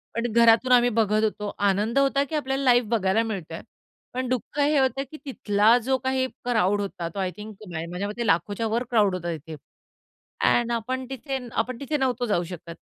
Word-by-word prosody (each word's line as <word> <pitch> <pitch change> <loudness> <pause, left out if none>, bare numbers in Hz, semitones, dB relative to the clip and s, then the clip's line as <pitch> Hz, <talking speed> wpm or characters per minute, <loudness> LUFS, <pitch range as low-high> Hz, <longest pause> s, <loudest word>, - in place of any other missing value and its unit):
पण 230 0 -1
घरातून 235 +2 +5
आम्ही 245 -1 +6
बघत 215 -2 +1
होतो. 210 -1 -2
आनंद 205 +5 +2
होता, 275 0 +2
की 295 +3 -5
आपल्याला 270 -2 -1
लाईव्ह 245 -4 +4
बघायला 220 -1 +2
मिळतोय, 185 -7 -5 0.5
पण 255 +1 -2
दुःख 255 +3 -3
हे 290 +1 +3
होतं 265 0 +1
की 310 - -8
तिथला 220 -3 +3
जो 265 0 +2
काही 260 0 0 0.2
क्राउड 205 -4 +2
होता 180 -4 -4
तो 200 - -5
आय 185 -1 -1
थिंक 210 0 -9
नाही 165 -1 -4
माझ्या 185 +3 -3
मते 235 +3 -4
लाखोच्या 200 +6 +1
वर 230 +3 0
क्राउड 205 -5 +3
होता 175 -2 -3
तिथे. 155 +2 -10 0.9
अँन्ड 240 0 +3
आपण 255 +3 -2
तिथे 270 +1 -4
आपण 235 +1 -2
तिथे 290 +2 -2
नव्हतो 250 -3 0
जाऊ 205 -6 +1
शकत. 170 -1 -9
230 Hz, 190 wpm, -25 LUFS, 205-260 Hz, 0.9 s, आम्ही